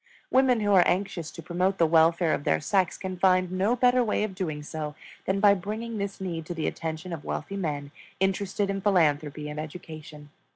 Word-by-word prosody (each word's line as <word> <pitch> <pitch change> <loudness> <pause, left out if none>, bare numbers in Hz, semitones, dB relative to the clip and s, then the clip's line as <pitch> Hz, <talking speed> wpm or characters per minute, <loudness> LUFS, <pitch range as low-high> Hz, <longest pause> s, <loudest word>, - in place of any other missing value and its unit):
Women 255 -3 +4
who 205 -1 +2
are 185 - +7
anxious 175 -3 -1
to 165 - -10
promote 185 +4 0
the 165 - +4
welfare 165 +1 +4
of - - -2
their 80 - +2
sex 185 - +1
can 185 -1 -6
find 185 -1 +3
no 195 +6 +1
better 250 0 +4
way 210 -2 0
of 215 -3 -3
doing 160 -6 -4
so 150 -1 -5 0.3
than 190 +1 0
by 200 0 +6
bringing 215 +4 -4
this 200 0 -4
need 170 -4 -4
to 175 - -4
the 160 - -2
attention 160 +2 -4
of 160 - -6
wealthy 200 - -4
men 145 -6 -3 0.3
interested 195 +1 0
in 195 0 -3
philanthropy 150 -6 +1
and 150 0 -5
education. 155 -2 -9
180 Hz, 200 wpm, -27 LUFS, 155-200 Hz, 0.3 s, are